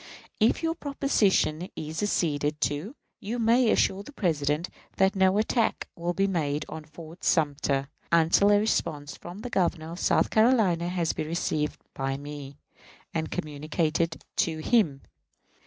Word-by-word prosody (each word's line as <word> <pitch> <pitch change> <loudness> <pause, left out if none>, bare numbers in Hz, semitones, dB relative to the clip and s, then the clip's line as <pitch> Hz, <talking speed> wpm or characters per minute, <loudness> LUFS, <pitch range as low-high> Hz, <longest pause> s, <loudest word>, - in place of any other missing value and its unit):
If 225 +8 +3
your 325 0 +1
proposition 215 - +1
is 155 +1 -4
acceded 150 -7 0
to, 150 - -2 0.2
you 225 +4 -4
may 235 +1 +4
assure 195 -2 +2
the 210 - -11
President 155 - 0 0.3
that 190 +1 +3
no 190 0 +3
attack 225 +2 +1
will 170 +1 -2
be 195 - +2
made 155 -6 -1
on 155 -1 -8
Fort 160 +2 -12
Sumter 140 -3 +1 0.2
until 170 +4 +5
a 205 - +6
response 150 -9 -1
from 175 +4 -9
the 245 +1 -6
Governor 170 -4 0
of 175 - -7
South - - +2
Carolina 215 -7 +3
has 175 -3 0
been 155 - -4
received 155 -2 -1
by 135 0 -2
me, 145 -1 -8 0.6
and 160 -1 -2
communicated 155 +2 -2
to 160 -2 +1
him. 155 - +1
170 Hz, 145 wpm, -27 LUFS, 150-200 Hz, 0.6 s, a